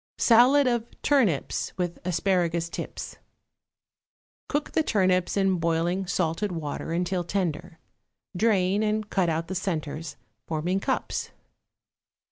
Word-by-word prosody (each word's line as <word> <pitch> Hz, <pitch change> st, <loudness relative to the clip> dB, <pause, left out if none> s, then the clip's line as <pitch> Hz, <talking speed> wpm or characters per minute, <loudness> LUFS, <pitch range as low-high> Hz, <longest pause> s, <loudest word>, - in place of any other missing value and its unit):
=Salad 255 Hz, +5 st, +6 dB
of 240 Hz, -2 st, -1 dB
Turnips 225 Hz, -, +1 dB
with 175 Hz, -2 st, -2 dB
Asparagus 175 Hz, -1 st, 0 dB
Tips.= -, -, -6 dB, 1.3 s
Cook 290 Hz, 0 st, -1 dB
the -, -, +2 dB
turnips 185 Hz, -, +1 dB
in 190 Hz, -2 st, +2 dB
boiling 170 Hz, +3 st, 0 dB
salted 180 Hz, +3 st, -1 dB
water 160 Hz, -2 st, -4 dB
until 175 Hz, +1 st, 0 dB
tender; 175 Hz, -3 st, -3 dB, 0.6 s
drain, 195 Hz, -1 st, +2 dB
and 215 Hz, 0 st, 0 dB
cut 185 Hz, -3 st, +2 dB
out 165 Hz, +1 st, -1 dB
the 190 Hz, -, -4 dB
centres, 165 Hz, -4 st, -3 dB, 0.3 s
forming 170 Hz, +4 st, -1 dB
cups. -, -, -2 dB
180 Hz, 110 wpm, -26 LUFS, 165-205 Hz, 1.3 s, =Salad